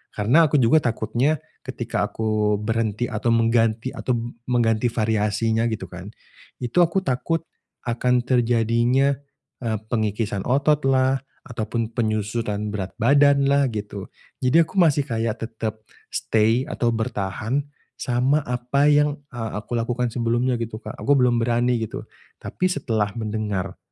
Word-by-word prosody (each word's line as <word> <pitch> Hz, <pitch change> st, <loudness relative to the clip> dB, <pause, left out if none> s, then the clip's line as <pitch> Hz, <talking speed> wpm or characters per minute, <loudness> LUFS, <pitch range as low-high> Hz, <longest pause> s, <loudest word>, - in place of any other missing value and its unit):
Karena 130 Hz, +11 st, +4 dB
aku 150 Hz, -, -1 dB
juga 135 Hz, +3 st, +5 dB
takutnya 125 Hz, +4 st, 0 dB, 0.2 s
ketika -, -, -3 dB
aku 110 Hz, -1 st, 0 dB
berhenti 110 Hz, +1 st, -1 dB
atau 110 Hz, +2 st, -3 dB
mengganti 115 Hz, +1 st, +2 dB
atau 125 Hz, -, -2 dB
b 115 Hz, -, -3 dB, 0.2 s
mengganti 120 Hz, -1 st, +2 dB
variasinya 110 Hz, 0 st, 0 dB
gitu 110 Hz, -2 st, -3 dB
kan, -, -, -8 dB, 0.6 s
itu 120 Hz, +8 st, 0 dB
aku 175 Hz, +2 st, +3 dB
takut 165 Hz, +3 st, -1 dB, 0.4 s
akan 125 Hz, +1 st, +1 dB
terjadinya, 120 Hz, +2 st, +2 dB, 0.5 s
eee, 115 Hz, -3 st, -1 dB
pengikisan 105 Hz, -3 st, -1 dB
ototlah 135 Hz, -1 st, +2 dB, 0.3 s
ataupun 115 Hz, -2 st, -3 dB
penyusutan 110 Hz, -2 st, -2 dB
berat 95 Hz, -3 st, -3 dB
badanlah 140 Hz, -1 st, +4 dB
gitu. 105 Hz, -3 st, -6 dB, 0.3 s
Jadi 155 Hz, +6 st, +4 dB
aku 185 Hz, +3 st, 0 dB
masih 145 Hz, -4 st, +3 dB
kayak 115 Hz, -3 st, -2 dB
tetep 110 Hz, -1 st, -6 dB, 0.2 s
stay 115 Hz, +4 st, +1 dB
atau 120 Hz, -5 st, -1 dB
bertahan 110 Hz, +2 st, -2 dB, 0.3 s
sama 130 Hz, +4 st, +1 dB
apa 125 Hz, +4 st, +2 dB
yang, 145 Hz, 0 st, +3 dB
ah, 115 Hz, -3 st, -5 dB
aku 120 Hz, +3 st, -3 dB
lakukan 120 Hz, +1 st, -1 dB
sebelumnya 120 Hz, +2 st, 0 dB
gitu, 115 Hz, -1 st, -5 dB
Kak. -, -, -8 dB
Aku 145 Hz, -, +2 dB
belum 125 Hz, -3 st, +3 dB
berani 120 Hz, +1 st, +1 dB
gitu. 110 Hz, -2 st, -4 dB, 0.4 s
Tapi 185 Hz, -, -3 dB
setelah 115 Hz, -, 0 dB
mendengar 105 Hz, -4 st, -3 dB
120 Hz, 130 wpm, -23 LUFS, 110-130 Hz, 0.6 s, juga